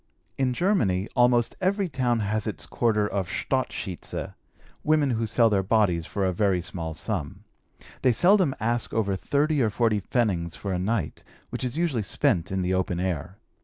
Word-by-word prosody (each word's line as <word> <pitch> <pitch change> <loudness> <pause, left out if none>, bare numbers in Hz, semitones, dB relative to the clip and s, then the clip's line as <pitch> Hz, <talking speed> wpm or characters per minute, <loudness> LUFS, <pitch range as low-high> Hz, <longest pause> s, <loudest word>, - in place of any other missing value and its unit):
In 130 -2 0
Germany 110 - +1
almost 120 -2 +3
every 195 +1 +1
town 125 -6 0
has 105 +1 -1
its 80 -7 -4
quarter 105 +1 +1
of 95 -3 -3
"Stadt 130 -1 -1
Schieze": 95 -5 -5 0.5
women 150 -3 +3
who 115 -1 -1
sell 115 +2 +3
their 100 -3 +2
bodies 95 -5 +1
for 100 -2 -1
a 95 - +1
very 95 -1 +2
small 85 -2 -5
sum. 80 -3 -4 0.6
They 130 - +4
seldom 175 - +4
ask 120 +1 -1
over 100 -3 +1
thirty 145 +7 +1
or 115 - +3
forty 110 0 +1
pfennigs 90 -8 -1
for 100 -2 -4
a 90 - -1
night, 95 -3 -2 0.3
which - - -4
is 125 +3 -3
usually 165 -9 0
spent 95 -1 0
in 95 -1 -1
the 90 +1 0
open 90 -2 -1
air. 90 0 -3
110 Hz, 175 wpm, -26 LUFS, 95-125 Hz, 0.6 s, They